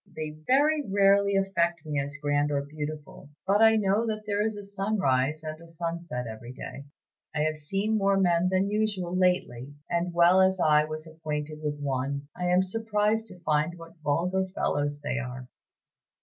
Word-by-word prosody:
They 155 Hz, -1 st, -4 dB
very 275 Hz, -, +2 dB
rarely 200 Hz, -1 st, +3 dB
affect 170 Hz, -4 st, 0 dB
me 150 Hz, -2 st, -1 dB
as 140 Hz, +1 st, -4 dB
grand 145 Hz, 0 st, +1 dB
or 140 Hz, -1 st, 0 dB
beautiful; 150 Hz, 0 st, -7 dB, 0.2 s
but 200 Hz, +3 st, +3 dB
I 225 Hz, 0 st, +7 dB
know 210 Hz, +2 st, +2 dB
that 215 Hz, -1 st, -3 dB
there 205 Hz, 0 st, 0 dB
is 220 Hz, 0 st, -1 dB
a 205 Hz, -, -7 dB
sunrise 190 Hz, -8 st, 0 dB
and 155 Hz, +1 st, -6 dB
a 170 Hz, -, -13 dB
sunset 165 Hz, -6 st, -4 dB
every 115 Hz, +2 st, -8 dB
day. 140 Hz, +1 st, -8 dB, 0.5 s
I 150 Hz, -, +1 dB
have 155 Hz, 0 st, 0 dB
seen 195 Hz, +8 st, 0 dB
more 195 Hz, 0 st, +3 dB
men 175 Hz, -1 st, +3 dB
than 190 Hz, +1 st, +2 dB
usual 205 Hz, -4 st, -1 dB
lately; 145 Hz, -8 st, 0 dB, 0.2 s
and 170 Hz, +1 st, 0 dB
well 175 Hz, +2 st, +5 dB
as 190 Hz, 0 st, +3 dB
I 150 Hz, -2 st, +4 dB
was 155 Hz, +1 st, -6 dB
acquainted 155 Hz, -1 st, -5 dB
with 145 Hz, -1 st, -3 dB
one, 140 Hz, +1 st, -2 dB
I 180 Hz, 0 st, -2 dB
am 180 Hz, +1 st, +4 dB
surprised 220 Hz, +2 st, 0 dB
to 180 Hz, -4 st, -13 dB
find 155 Hz, +1 st, 0 dB
what 165 Hz, 0 st, -13 dB
vulgar 180 Hz, +6 st, 0 dB
fellows 145 Hz, 0 st, -1 dB
they 140 Hz, -, -2 dB
are." 130 Hz, -1 st, -6 dB
170 Hz, 180 wpm, -27 LUFS, 150-195 Hz, 0.5 s, I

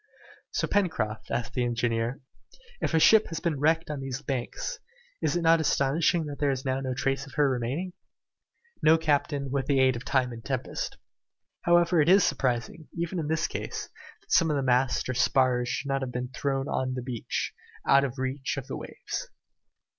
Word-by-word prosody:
"So, -, -, -1 dB
Pencroft," 120 Hz, -, -1 dB
asked 120 Hz, 0 st, -2 dB
the 125 Hz, -, 0 dB
engineer, 120 Hz, 0 st, -1 dB, 0.6 s
"if -, -, 0 dB
a -, -, +5 dB
ship 220 Hz, +6 st, +6 dB
has 165 Hz, -1 st, -4 dB
been 160 Hz, -5 st, -1 dB
wrecked 160 Hz, +2 st, +2 dB
on 145 Hz, -, -4 dB
these 135 Hz, +1 st, -5 dB
banks, 135 Hz, -, -3 dB, 0.4 s
is -, -, +1 dB
it 175 Hz, -, 0 dB
not 165 Hz, 0 st, +5 dB
astonishing 155 Hz, +3 st, +2 dB
that 145 Hz, -1 st, -7 dB
there 145 Hz, -, +2 dB
is 135 Hz, 0 st, -2 dB
now 130 Hz, 0 st, 0 dB
no 130 Hz, -1 st, -3 dB
trace 135 Hz, +1 st, -1 dB
of 135 Hz, -, -13 dB
her 145 Hz, -1 st, +4 dB
remaining?" 135 Hz, +8 st, -2 dB, 0.9 s
"No, 160 Hz, +1 st, +6 dB
captain, 145 Hz, -3 st, 0 dB
with 135 Hz, -1 st, -1 dB
the 140 Hz, -2 st, +3 dB
aid 130 Hz, -1 st, +4 dB
of 120 Hz, -, -6 dB
time 130 Hz, -4 st, +1 dB
and 115 Hz, -1 st, -9 dB
tempest. -, -, -3 dB, 0.7 s
However, 175 Hz, -1 st, +4 dB
it 145 Hz, -, +2 dB
would -, -, +8 dB
be -, -, +6 dB
surprising, 135 Hz, 0 st, -1 dB
even 170 Hz, +1 st, -2 dB
in 155 Hz, -, -2 dB
this 160 Hz, +1 st, +1 dB
case, -, -, -4 dB, 0.3 s
that -, -, -19 dB
some 165 Hz, -, +5 dB
of 150 Hz, -, +1 dB
the 140 Hz, -, 0 dB
masts 125 Hz, 0 st, +2 dB
or 130 Hz, -, -1 dB
spars 125 Hz, 0 st, +2 dB
should 140 Hz, +2 st, -3 dB
not 135 Hz, 0 st, 0 dB
have 130 Hz, -1 st, -3 dB
been 125 Hz, 0 st, -3 dB
thrown 135 Hz, +1 st, -2 dB
on 130 Hz, -1 st, -1 dB
the 125 Hz, -, -4 dB
beach, 120 Hz, -3 st, -3 dB, 0.3 s
out 140 Hz, 0 st, +6 dB
of 135 Hz, -1 st, -3 dB
reach 130 Hz, +2 st, -2 dB
of 135 Hz, -, -4 dB
the 135 Hz, -, -5 dB
waves." -, -, -6 dB
135 Hz, 200 wpm, -28 LUFS, 125-155 Hz, 0.9 s, would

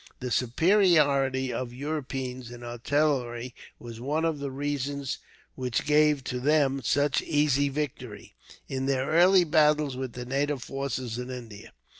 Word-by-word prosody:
The 125 Hz, -1 st, -4 dB
superiority 140 Hz, -, +3 dB
of 125 Hz, -2 st, -4 dB
Europeans 130 Hz, -3 st, -4 dB
in 120 Hz, 0 st, -10 dB
artillery 120 Hz, -1 st, -1 dB, 0.2 s
was 115 Hz, -1 st, -10 dB
one 150 Hz, +5 st, 0 dB
of 160 Hz, -3 st, -1 dB
the 140 Hz, -1 st, -3 dB
reasons 140 Hz, 0 st, -3 dB, 0.3 s
which 125 Hz, -3 st, -2 dB
gave 150 Hz, -1 st, +3 dB
to 125 Hz, 0 st, -3 dB
them 140 Hz, 0 st, +2 dB
such 145 Hz, +6 st, +2 dB
easy 145 Hz, -2 st, +2 dB
victory, 130 Hz, -7 st, -5 dB, 0.3 s
in 135 Hz, 0 st, -3 dB
their 135 Hz, -1 st, +1 dB
early 180 Hz, +3 st, +6 dB
battles 150 Hz, -3 st, +3 dB
with 130 Hz, -2 st, -5 dB
the 125 Hz, 0 st, -6 dB
native 140 Hz, +1 st, -1 dB
forces 130 Hz, -4 st, -4 dB
in 125 Hz, +1 st, -5 dB
India. 115 Hz, -5 st, -9 dB
135 Hz, 140 wpm, -27 LUFS, 125-150 Hz, 0.3 s, early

